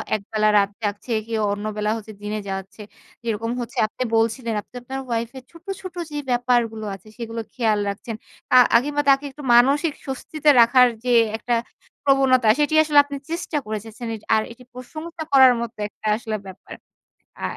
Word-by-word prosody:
একবেলা 215 Hz, +1 st, 0 dB
রাত 200 Hz, -1 st, +3 dB
জাগছে, 205 Hz, +4 st, -3 dB, 0.2 s
কেউ 225 Hz, -1 st, -1 dB
অন্যবেলা 210 Hz, +1 st, -2 dB
হচ্ছে 220 Hz, 0 st, -10 dB
দিনে 210 Hz, +1 st, -3 dB
যাচ্ছে। 195 Hz, +2 st, -6 dB, 0.4 s
যেরকম 230 Hz, 0 st, -2 dB
হচ্ছে 235 Hz, -, -8 dB
আপনি 255 Hz, -, -4 dB
বলছিলেন 225 Hz, +1 st, 0 dB
আপনি 245 Hz, -, -25 dB
আপনার 265 Hz, +2 st, -6 dB
ওয়াইফ 230 Hz, -1 st, -2 dB
এর 260 Hz, -, -9 dB
ছোট, 335 Hz, -1 st, -17 dB, 0.2 s
ছোট 370 Hz, -2 st, -8 dB, 0.2 s
যে 295 Hz, -, -4 dB
ব্যাপারগুলো 240 Hz, -3 st, +1 dB
আছে 195 Hz, +2 st, -17 dB
সেগুলো 230 Hz, -1 st, -5 dB
খেয়াল 220 Hz, -4 st, +1 dB
রাখছেন। 215 Hz, +3 st, -5 dB, 0.4 s
আ -, -, +7 dB, 0.2 s
আগে 250 Hz, +5 st, +4 dB
মা 290 Hz, -, +3 dB
তাকে 275 Hz, +1 st, +4 dB
একটু 290 Hz, +2 st, -12 dB
মানসিক 280 Hz, +6 st, +4 dB
স্বস্তিতে 295 Hz, +2 st, -1 dB
রাখার 250 Hz, +2 st, +6 dB, 0.2 s
যে 250 Hz, -, +1 dB, 0.3 s
একটা 240 Hz, +2 st, -2 dB, 0.5 s
প্রবণতা 265 Hz, -3 st, +4 dB
সেটি 295 Hz, +1 st, +1 dB
আসলে 300 Hz, -2 st, +5 dB
আপনি 285 Hz, 0 st, -6 dB
চেষ্টা 330 Hz, -2 st, -3 dB
করে 215 Hz, 0 st, -3 dB
এসেছেন। 225 Hz, +2 st, -9 dB, 0.3 s
আর 220 Hz, -, +3 dB
এটি 240 Hz, +2 st, -13 dB
প্রশংসা 315 Hz, +6 st, -8 dB
করার 265 Hz, -2 st, +7 dB
মত 235 Hz, -, -4 dB, 0.2 s
একটা 215 Hz, -, -9 dB
আসলে 225 Hz, -2 st, -4 dB
ব্যাপার। 190 Hz, -, -11 dB, 0.7 s
আ -, -, -6 dB
235 Hz, 170 wpm, -22 LUFS, 215-270 Hz, 0.7 s, আ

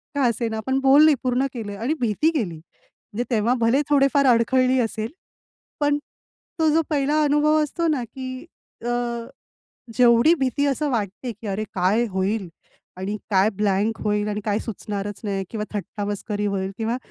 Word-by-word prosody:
का 285 Hz, -, +1 dB
असेना 230 Hz, -2 st, -1 dB
पण 265 Hz, 0 st, +2 dB
बोलली, 285 Hz, +3 st, +6 dB
पूर्ण 255 Hz, +1 st, +1 dB
केलं 205 Hz, -4 st, -6 dB
आणि 245 Hz, +7 st, 0 dB
भीती 240 Hz, +7 st, +2 dB
गेली. 190 Hz, -, -1 dB
म्हणजे 205 Hz, +7 st, -9 dB
तेव्हा 230 Hz, +2 st, +2 dB
भले 235 Hz, +5 st, +3 dB
थोडेफार 280 Hz, 0 st, +4 dB
अडखळली 255 Hz, +2 st, +3 dB
असेल 225 Hz, -1 st, -2 dB, 0.7 s
पण 290 Hz, 0 st, +2 dB, 0.6 s
तो 320 Hz, -, +4 dB
जो 325 Hz, -, +4 dB
पहिला 295 Hz, +1 st, +2 dB
अनुभव 300 Hz, +1 st, +3 dB
असतो 330 Hz, +3 st, -1 dB
ना 285 Hz, -5 st, +1 dB
की 255 Hz, +4 st, -7 dB, 0.4 s
अ, -, -, -2 dB, 1.1 s
जेवढी 245 Hz, +6 st, +6 dB
भीती 270 Hz, +2 st, +1 dB
असं 285 Hz, +1 st, 0 dB
वाटते 230 Hz, +1 st, -3 dB
की 220 Hz, +1 st, -11 dB
अरे 200 Hz, +2 st, -2 dB
काय 200 Hz, +6 st, +2 dB
होईल? 190 Hz, +1 st, -1 dB, 0.5 s
आणि 195 Hz, +3 st, -3 dB
काय 195 Hz, +2 st, +4 dB
ब्लँक 210 Hz, +2 st, +1 dB
होईल 210 Hz, 0 st, 0 dB
आणि 210 Hz, 0 st, -2 dB
काय 210 Hz, -1 st, +1 dB
सुचणारच 205 Hz, -2 st, -5 dB
नाही 195 Hz, -1 st, -2 dB
किंवा 215 Hz, -2 st, -3 dB
थट्टा 205 Hz, 0 st, -4 dB
मस्करी 205 Hz, 0 st, -3 dB
होईल 195 Hz, -1 st, -2 dB
किंवा 225 Hz, +1 st, -1 dB
230 Hz, 160 wpm, -23 LUFS, 205-270 Hz, 1.1 s, बोलली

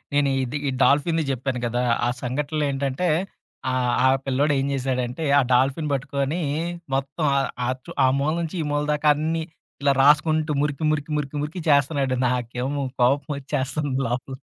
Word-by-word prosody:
నేను 145 Hz, -1 st, +3 dB
ఇది 130 Hz, +3 st, -3 dB
ఈ -, -, +1 dB
డాల్ఫిన్‌ని 160 Hz, +3 st, +3 dB
చెప్పాను 130 Hz, 0 st, -2 dB
కదా! 120 Hz, +1 st, -1 dB, 0.2 s
ఆ -, -, +2 dB
సంఘటనలేంటంటే, 140 Hz, +3 st, -1 dB, 0.6 s
ఆహ్, 125 Hz, -1 st, +1 dB
ఆ -, -, +6 dB, 0.2 s
పిల్లోడేం 135 Hz, +1 st, +1 dB
జేశాడంటే 130 Hz, +1 st, -2 dB, 0.2 s
ఆ -, -, +2 dB
డాల్ఫిన్ 135 Hz, +4 st, +2 dB
పట్టుకొని 140 Hz, +4 st, -1 dB, 0.5 s
మొత్తం 135 Hz, +4 st, -2 dB
ఆహ్, 135 Hz, -, +1 dB, 0.2 s
ఆహ్, 130 Hz, +1 st, -1 dB
చు -, -, -9 dB
ఆ -, -, +6 dB
మూల 150 Hz, +2 st, +1 dB
నుంచి 165 Hz, +1 st, -4 dB
ఈ -, -, -3 dB
మూల 145 Hz, 0 st, 0 dB
దాకా 150 Hz, 0 st, +1 dB
అన్నీ 160 Hz, +2 st, -1 dB, 0.4 s
ఇలా 140 Hz, -1 st, +4 dB
రాసుకుంటూ 155 Hz, +2 st, +4 dB
మురికి, 150 Hz, +1 st, -2 dB
మురికి, 150 Hz, 0 st, -3 dB
మురికి, 150 Hz, 0 st, -3 dB
మురికి 155 Hz, +5 st, -5 dB
చేస్తున్నాడు 140 Hz, -2 st, +2 dB
నాకేమో 125 Hz, +3 st, -2 dB, 0.2 s
కోపమొచ్చేస్తంది 140 Hz, 0 st, 0 dB
లోపల. 125 Hz, +2 st, -3 dB
140 Hz, 150 wpm, -23 LUFS, 130-150 Hz, 0.6 s, ఆ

